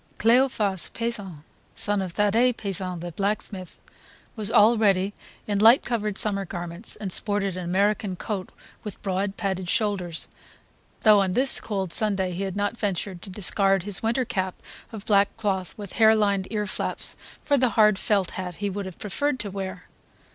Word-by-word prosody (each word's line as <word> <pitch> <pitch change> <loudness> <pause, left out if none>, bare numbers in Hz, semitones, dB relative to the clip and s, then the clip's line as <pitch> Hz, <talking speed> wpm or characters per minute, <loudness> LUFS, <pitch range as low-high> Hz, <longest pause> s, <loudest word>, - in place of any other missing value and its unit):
Cleophas 225 -5 +2
Pesant, 205 -10 -3 0.3
son 205 -1 -1
of 185 -3 -4
Thadee 225 +5 +3
Pesant 185 -5 -4
the 175 0 -5
blacksmith, 195 0 -3 0.6
was 215 -3 -1
already 210 -3 +4 0.3
in 205 -1 -1
light 230 +5 +7
coloured 215 -4 -2
summer 200 -2 +1
garments, 175 +2 -7
and 200 -3 -5
sported 205 -3 +1
an 185 - -4
American 200 +2 +1
coat 190 0 -4 0.3
with 210 -3 -7
broad 195 0 -2
padded 190 -2 -2
shoulders; 185 -7 -1 0.7
though 215 -2 +6
on 190 -2 0
this 260 +5 +4
cold 195 -5 -3
Sunday 195 -4 +1
he 180 +2 -4
had 195 -1 -3
not 205 +2 -1
ventured 195 -4 -2
to - - -10
discard 195 0 +2
his 200 -1 +2
winter 235 +3 0
cap 190 -4 -2 0.4
of 215 -3 -8
black 200 -2 +3
cloth 190 -4 -2
with 205 -3 -8
harelined 210 -4 +3
ear 210 -2 -1
laps - - -3 0.3
for 285 - +2
the 255 -2 +3
hard 215 -2 +5
felt 200 -4 +1
hat 180 -2 -5
he 205 +1 -3
would 200 0 -4
have 185 - -9
preferred 260 +6 -2
to 205 -2 -3
wear. 190 -2 -5
200 Hz, 165 wpm, -25 LUFS, 190-215 Hz, 0.7 s, light